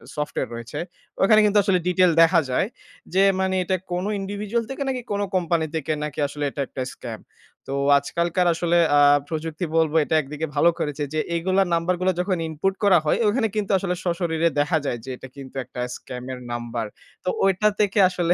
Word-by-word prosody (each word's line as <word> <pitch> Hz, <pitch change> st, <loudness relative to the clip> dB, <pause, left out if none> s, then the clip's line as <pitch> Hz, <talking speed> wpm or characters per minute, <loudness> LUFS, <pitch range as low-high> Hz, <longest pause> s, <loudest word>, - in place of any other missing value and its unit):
Software 150 Hz, -3 st, -3 dB
রয়েছে। 115 Hz, 0 st, -6 dB, 0.4 s
ওখানে 215 Hz, +2 st, +6 dB
কিন্তু 210 Hz, 0 st, +3 dB
আসলে 190 Hz, -2 st, +2 dB
detail 180 Hz, 0 st, +4 dB
দেখা 165 Hz, +1 st, +6 dB
যায়। 130 Hz, +9 st, +1 dB, 0.5 s
যে 190 Hz, +1 st, +4 dB, 0.2 s
মানে 190 Hz, 0 st, +1 dB
এটা 185 Hz, +1 st, 0 dB, 0.2 s
কোনো 180 Hz, +3 st, -1 dB
individual 205 Hz, +4 st, -2 dB
থেকে 270 Hz, +1 st, -3 dB
নাকি 260 Hz, -2 st, -1 dB
কোনো 205 Hz, 0 st, 0 dB
কোম্পানি 170 Hz, -3 st, +1 dB
থেকে 155 Hz, -1 st, -2 dB
নাকি 150 Hz, -1 st, -5 dB
আসলে 145 Hz, +1 st, -6 dB
এটা 140 Hz, -, -5 dB
একটা 130 Hz, -, -6 dB
স্ক্যাম? 115 Hz, -3 st, -8 dB, 0.5 s
তো 135 Hz, -, -4 dB, 0.2 s
আজকালকার 170 Hz, +5 st, 0 dB
আসলে 170 Hz, +1 st, +1 dB, 0.2 s
আ -, -, +6 dB, 0.3 s
প্রযুক্তি 160 Hz, +2 st, -3 dB
বলবো 160 Hz, -1 st, +2 dB
এটা 160 Hz, -, -1 dB
একদিকে 150 Hz, +2 st, -5 dB
ভালো 150 Hz, +4 st, +5 dB
করেছে 150 Hz, 0 st, -2 dB
যে 155 Hz, -, 0 dB, 0.2 s
এগুলা 185 Hz, +3 st, +2 dB
নাম্বারগুলা 180 Hz, +2 st, +1 dB
যখন 180 Hz, +1 st, 0 dB
ইনপুট 160 Hz, +5 st, -1 dB
করা 195 Hz, -3 st, +6 dB
হয় 150 Hz, -, +2 dB
ওখানে 225 Hz, +2 st, +2 dB
কিন্তু 210 Hz, -2 st, -1 dB
আসলে 180 Hz, -1 st, -2 dB
সশরীরে 170 Hz, -2 st, 0 dB
দেখা 150 Hz, +3 st, +2 dB
যায় 120 Hz, -, -1 dB
যে 135 Hz, -, -9 dB
এটা 130 Hz, -, -11 dB
কিন্তু 135 Hz, -1 st, -11 dB
একটা 125 Hz, 0 st, -7 dB
স্ক্যামের 125 Hz, 0 st, -7 dB
নাম্বার। 120 Hz, -1 st, -3 dB, 0.4 s
তো -, -, +1 dB, 0.2 s
ঐটা 195 Hz, +2 st, +3 dB
থেকে 205 Hz, -1 st, +2 dB
আসলে 175 Hz, -2 st, +1 dB
170 Hz, 185 wpm, -23 LUFS, 150-190 Hz, 0.5 s, ওখানে